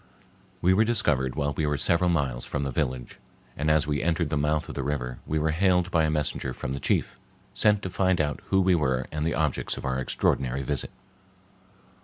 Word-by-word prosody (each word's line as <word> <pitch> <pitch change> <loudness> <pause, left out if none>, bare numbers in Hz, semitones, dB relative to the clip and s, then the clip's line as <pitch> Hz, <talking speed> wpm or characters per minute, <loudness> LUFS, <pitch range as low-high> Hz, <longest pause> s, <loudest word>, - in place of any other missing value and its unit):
We 90 +2 +5
were 105 +4 +4
discovered 70 - +1
while 70 -1 -1
we 75 +2 -1
were 75 -1 0
several 85 +5 +2
miles 70 -8 0
from 75 - -3
the 70 - -2
village, 60 0 -3 0.4
and 75 +2 -1
as 75 -1 +3
we 75 -1 -1
entered 85 -2 0
the - - +1
mouth 75 +1 0
of - - -7
the 70 - -3
river 65 -3 -3
we 80 - 0
were 80 +1 +1
hailed 90 +2 +2
by 80 -2 +3
a - - +1
messenger 75 -4 -1
from 65 - -4
the 70 - -3
chief, - - -1 0.3
sent 105 -1 +3
to 95 - -3
find 95 0 +1
out 75 -1 -1
who 95 0 +3
we 95 0 +3
were 65 -6 +1
and 75 0 -2
the 80 - 0
objects 75 -4 -1
of - - -6
our 65 0 -1
extraordinary 65 0 0
visit. 70 -1 -2
75 Hz, 215 wpm, -26 LUFS, 65-85 Hz, 0.4 s, We